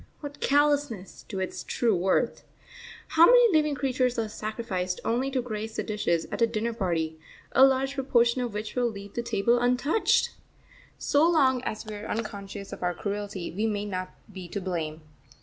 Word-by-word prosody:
What 290 -1 -8
callousness 285 -8 +1
to 195 - -4
its 185 - -4
true 230 -4 +1
worth! 185 +2 +1 0.7
How 330 +1 +7
many 485 -6 +6
living 300 -2 +3
creatures 255 -3 0
are 225 -1 0
sacrificed 210 -4 -3
only 250 +4 +1
to 260 -2 -1
grace 220 -1 -5
the - - -1
dishes 205 -6 0
at - - -4
a 230 - +5
dinner 230 +1 -2
party, 165 -7 -2 0.3
a 265 - +6
large 270 0 +4
proportion 255 -3 +2
of 240 -4 -3
which 210 0 -4
will 245 -1 +2
leave 200 -2 -9
the 235 - -2
table 235 +1 +2
untouched! 250 - +2 0.7
So 300 +4 +3
long 265 -7 +3
as 215 - -4
we 215 - -7
are 205 - -7
unconscious 200 -2 -5
of - - -8
our 180 -1 0
cruelty 205 -3 -4
we 210 +6 -1
may 205 -1 -2
not 185 -2 -4 0.2
be 185 -2 -7
to 200 - -4
blame. 165 -4 -3
225 Hz, 180 wpm, -27 LUFS, 200-260 Hz, 0.7 s, How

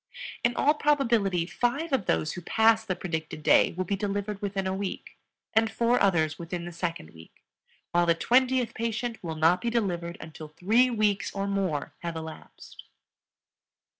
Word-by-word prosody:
In 240 0 +2
all 295 - +4
probability 235 - +2
five 275 - -1
of 230 -9 +1
those 155 - +1
who 180 - -7
pass 225 +4 +3
the 190 -4 -2
predicted 160 -4 -5
day - - +5
will 185 +2 -2
be 200 +3 -1
delivered 205 0 -3
within 195 -1 -2
a 190 - -1
week 195 0 -5 0.4
and 220 0 +3
four 235 +2 +1
others 160 -6 +2
within 170 0 -5
the 175 - -6
second 165 - -4
week, 80 0 -17 0.5
while 175 0 +2
the 170 - +4
twentieth 250 +3 +2
patient 230 0 -3
will 165 -2 -4
not 165 +3 +3
be 235 - 0
delivered 175 -7 -2
until 160 -1 -9
three 215 +11 +2
weeks 215 -4 0
or 195 0 -1
more 195 -7 -2
have 170 -1 -5
elapsed. 160 0 -10
195 Hz, 165 wpm, -27 LUFS, 170-230 Hz, 0.5 s, day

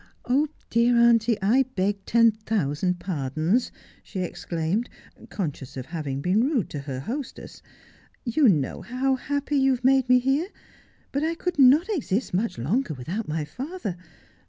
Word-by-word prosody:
Oh, 275 +5 +2 0.2
dear 235 +1 +3
auntie, 235 -2 +4
I 235 +7 +4
beg 200 +1 0
ten 230 0 +5
thousand 185 -5 -1
pardons,' 160 - -1 0.3
she 190 - -6
exclaimed, 175 +4 -2 0.4
conscious 145 -9 -5
of 130 - -5
having 145 -5 -4
been 190 +8 +2
rude 260 - 0
to 145 - -4
her 135 -2 -5
hostess, 255 - -6 0.3
' - - -32
you 290 -6 +6
know 145 -8 0
how 260 +2 0
happy 285 +2 -1
you 270 0 +4
have 245 - -11
made 265 -1 +4
me 250 - +7
here; 270 +7 +1 0.6
but 280 - -1
I 325 +1 0
could 355 -2 -3
not 275 +6 +7
exist 265 - -1
much 210 - -1
longer 160 - -1
without 175 - -4
my 155 0 -2
father. 255 - -5
225 Hz, 155 wpm, -25 LUFS, 165-265 Hz, 0.6 s, me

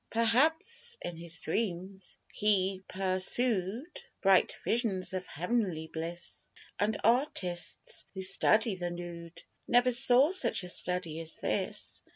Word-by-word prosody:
Perhaps 320 - +1
in 175 - -5
his 170 +1 -4
dreams 190 +1 -4 0.2
he 195 -2 +1
persood 195 - 0 0.2
Bright 195 -1 +3
visions 215 -6 -1
of 185 -1 -4
heav'nly 180 -3 -2
bliss; 170 +2 -6 0.3
And 210 +1 0
artists 205 - -1
who 190 - -4
study 215 +3 +3
the 175 -1 -4
nood 175 -1 -9 0.2
Never 245 +1 +4
saw 255 +4 +6
such 370 - +2
a 180 - -3
study 180 -3 -1
as 165 -1 -4
this. - - -3
190 Hz, 120 wpm, -30 LUFS, 175-235 Hz, 0.3 s, saw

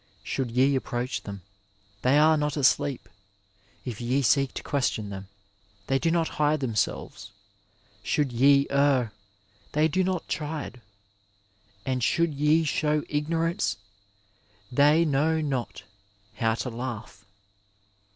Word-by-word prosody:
Should 130 -3 -2
ye 130 +4 +3
approach 125 -1 -2
them, 100 -2 -8 0.6
they 130 +3 +4
are 155 +1 +6
not 150 0 -1
asleep; 135 0 +1 0.8
if 120 -3 -5
ye 130 +4 +1
seek 135 +2 +3
to - - -5
question 115 -7 -1
them, 95 0 -7 0.6
they 135 +3 +1
do 165 - +1
not 165 -1 +1
hide 150 +1 +3
themselves; 115 -7 -2 0.7
should 145 -4 0
ye 140 +3 +5
err, 140 -5 +2 0.6
they 155 +1 +3
do 185 +4 +1
not 185 -2 -2
chide; 150 -5 -4 1.0
and 130 -2 -1
should 170 +5 +2
ye 150 +3 +3
show 150 0 0
ignorance, 165 +1 0 0.9
they 150 +5 +4
know 155 +2 +2
not 135 -6 -3 0.5
how 115 +1 0
to 125 +2 -4
laugh. 115 -4 -6
140 Hz, 120 wpm, -26 LUFS, 125-150 Hz, 1.0 s, are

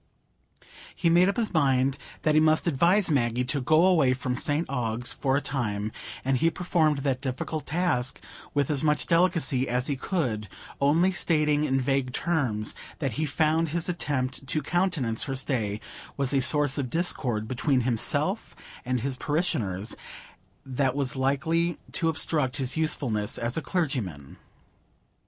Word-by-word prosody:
He 170 - +1
made 175 +3 +5
up 200 - -2
his 225 -4 0
mind 135 -3 +2 0.2
that 155 - +3
he 155 - +5
must 155 0 +3
advise 175 +4 +3
Maggie 125 -3 +1
to 140 +2 0
go 155 +6 +4
away 160 -9 +4
from 125 -1 -3
St 145 +6 0
Ogg's 120 -2 -1
for 135 -1 0
a - - 0
time; 110 -7 -2 0.3
and 135 0 +2
he 165 +5 +3
performed 155 -4 0
that 135 -2 0
difficult 140 +3 -4
task 150 -7 0 0.4
with 145 0 +1
as 145 - 0
much 150 -1 +1
delicacy 165 -7 +2
as 125 +1 0
he 140 - -1
could, 125 - -2 0.3
only 165 +7 +3
stating 150 -4 +2
in 135 -2 +1
vague 130 -1 0
terms 130 -12 -1 0.2
that 135 -4 -2
he 155 +8 -2
found 155 +3 +1
his 170 +2 -1
attempt 135 -6 -2
to 155 +2 0
countenance 170 -11 0
her 135 - -3
stay 115 -6 -1 0.4
was 140 -1 +1
a 135 - +3
source 145 +2 +3
of 130 -3 -2
discord 125 -9 0
between 130 +2 +1
himself 120 -2 -1 0.3
and 125 -1 -1
his 130 +1 -2
parishioners, 115 - -1 0.7
that 130 0 0
was 140 0 0
likely 160 +6 0
to 165 - +1
obstruct 150 -4 0
his 130 -3 -1
usefulness 130 -10 -1
as 120 +1 -2
a 160 - -1
clergyman. 125 - -3
140 Hz, 155 wpm, -26 LUFS, 125-160 Hz, 0.7 s, made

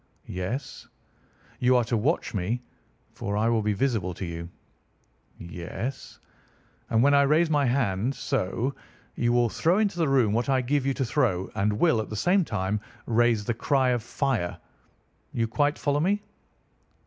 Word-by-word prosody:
"Yes." 95 +10 -5 0.7
"You 125 +1 +4
are 125 - +4
to 115 +1 -1
watch 130 +9 0
me, 110 +5 -2 0.5
for 100 0 -3
I 110 +2 +2
will 115 -2 +2
be 105 0 0
visible 100 -6 -1
to 95 - -5
you." 85 0 -6 0.9
"Yes." 85 +9 -6 0.7
"And 115 +1 +3
when 145 +1 +5
I 140 - +6
raise 155 +4 +3
my 145 -2 +3
hand—so—you 120 +1 -2
will 120 -1 +3
throw 170 - +2
into 205 -5 0
the 160 -4 +2
room 125 -6 +3
what 120 +4 0
I 130 -1 +3
give 135 +2 0
you 135 - +1
to 135 - -1
throw, 115 -8 0
and 105 0 +1
will, 115 0 +3
at 110 - -7
the 110 - -5
same 180 - +3
time, 105 - -2 0.2
raise 115 -2 +2
the 120 - 0
cry 130 +2 +1
of 120 -2 +1
fire. 120 -6 -1 0.8
You 115 -1 0
quite 145 +5 +1
follow 145 0 0
me?" 200 +6 +1
120 Hz, 160 wpm, -26 LUFS, 105-140 Hz, 0.9 s, I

